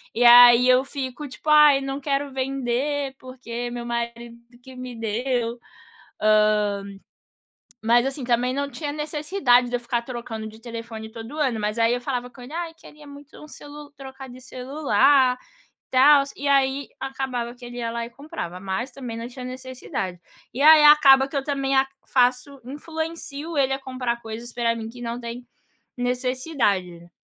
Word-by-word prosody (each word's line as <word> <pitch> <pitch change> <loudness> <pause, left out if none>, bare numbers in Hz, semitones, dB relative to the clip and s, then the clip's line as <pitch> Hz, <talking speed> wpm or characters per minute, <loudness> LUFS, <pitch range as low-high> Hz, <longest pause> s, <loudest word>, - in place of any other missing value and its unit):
e 245 - +2
aí 240 +1 +9
eu 255 +1 +5
fico 270 +1 -6
tipo: 275 +3 -7
"ai 300 -2 +7
não 270 0 -4
quero 280 0 -1
vender 270 +1 -2
porque 245 -2 -7
meu 240 0 -6
marido 235 0 -5 0.3
que 260 0 -13
me 255 0 -7
deu". 230 +2 -2 0.6
Hã, 215 0 +4 1.4
mas 240 +2 +4
assim 270 0 -4
também 245 +1 +1
não 280 +1 -2
tinha 295 0 -5
necessidade 300 -4 +1
de 245 - 0
eu - - -6
ficar 235 0 -2
trocando 235 -3 -6
de 220 0 -13
telefone 230 -2 -8
todo 230 +5 -9
ano, 255 -7 0
mas 210 +2 -2
aí 230 0 +3
eu 245 - -3
falava 250 -1 -4
com 250 - -16
ele: 250 +4 -11
"ai 335 -1 -4
queria 300 -2 -16
muito 285 +1 -13
um - - -10
celu 290 0 -12
trocar 265 0 -10
de 250 +1 -12
celular, 260 0 +2 0.5
tals" 275 +2 +5
e 285 - -5
aí 275 0 +2
acabava 260 -3 -4
que 245 0 -14
ele 240 0 -8
ia 230 -1 -3
lá 235 0 -3
e - - -12
comprava, 235 - -7
mas 195 +7 -3
também 245 -4 -7
não 230 +1 -5
tinha 250 0 -9
necessidade. 255 -8 -6 0.3
E 255 - -5
aí 310 0 +8
acaba 275 -3 +7
que 275 - -14
eu 275 - 0
também 275 -1 -1
a 265 0 +4 0.2
faço, 250 +2 +1
influencio 315 +2 -6
ele 270 -1 +2
a 270 - -1
comprar 255 -3 -3
coisas 225 +2 -8
pra 235 -1 0
mim 225 -1 -6
que 245 +1 -13
não 235 0 -4
tem 240 +1 -7 0.5
necessidade. 245 - -2
255 Hz, 170 wpm, -23 LUFS, 235-275 Hz, 1.4 s, aí